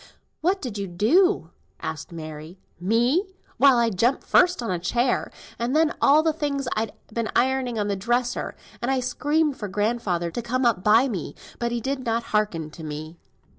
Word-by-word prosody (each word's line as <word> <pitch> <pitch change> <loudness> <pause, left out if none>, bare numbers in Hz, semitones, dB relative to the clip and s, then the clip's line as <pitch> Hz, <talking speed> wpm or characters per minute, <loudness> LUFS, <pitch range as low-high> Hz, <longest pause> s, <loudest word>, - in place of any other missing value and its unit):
"What 370 +3 0
did 220 -6 -4
you 200 - -3
do?" 275 - +2 0.3
asked - - -5
Mary. 155 +1 -8 0.2
"Me! 235 - +2 0.3
why, 270 +1 +6
I 235 -1 +2
jumped 235 +7 +1
first 360 -7 +3
on 230 - -2
a 180 - -1
chair, 240 +8 0 0.3
and 240 +4 -1
then 315 0 +4
on - - -10
all 300 +3 +6
the 320 -1 +2
things 280 -3 -2
I'd 220 -1 -2 0.2
been 230 -1 -1
ironing 255 -2 +1
on 205 -1 0
the 200 - 0
dresser, 240 +5 -1 0.3
and 240 - -1
I 270 -1 +2
screamed 295 +3 0
for 210 - -4
grandfather 200 -4 -1
to 240 - -3
come 250 +2 -1
up 220 -6 +2
by 225 +6 +5
me, 180 - -4 0.2
but 235 0 -1
he 240 - -1
did 265 +2 -2
not 230 -1 0
hearken 175 -8 0
to 160 - -10
me." 155 +2 -7
235 Hz, 190 wpm, -24 LUFS, 195-265 Hz, 0.3 s, why